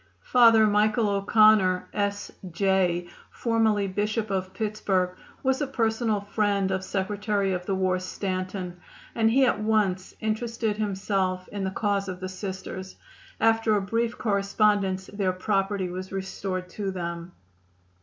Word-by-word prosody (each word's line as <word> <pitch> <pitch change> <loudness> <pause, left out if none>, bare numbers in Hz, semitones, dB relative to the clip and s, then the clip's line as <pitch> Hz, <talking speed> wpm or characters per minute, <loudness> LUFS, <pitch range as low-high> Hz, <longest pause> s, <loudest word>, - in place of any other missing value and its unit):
Father 230 -3 +6
Michael 215 +1 +2
O'Connor, 200 -2 +4
S. 205 -1 -2 0.2
J., 180 -1 +1 0.2
formerly 220 -3 +1
Bishop 210 +3 -1
of 190 -1 -2
Pittsburg, 205 -4 -1 0.3
was 265 +1 +1
a 290 - 0
personal 225 -4 0
friend 200 -1 0
of 190 0 -1
Secretary 200 0 -1
of 180 0 -4
the 195 - 0
War 185 -1 +1
Stanton, 185 -1 -4 0.3
and 225 -1 +3
he 265 +4 +4
at 245 - +1
once 210 -4 0
interested 220 0 -2
himself 190 -3 -1
in 205 -1 -4
the - - 0
cause 200 0 -1
of 180 -1 -5
the 185 0 -5
Sisters. 190 0 -6 0.4
After 225 -1 +3
a 205 - +1
brief 230 +4 -1
correspondence 200 -2 +1
their 195 -2 -1
property 195 0 -1
was 185 +1 -6
restored 190 -1 -4
to 200 +1 -4
them. 170 -1 -5
200 Hz, 135 wpm, -26 LUFS, 185-215 Hz, 0.4 s, Father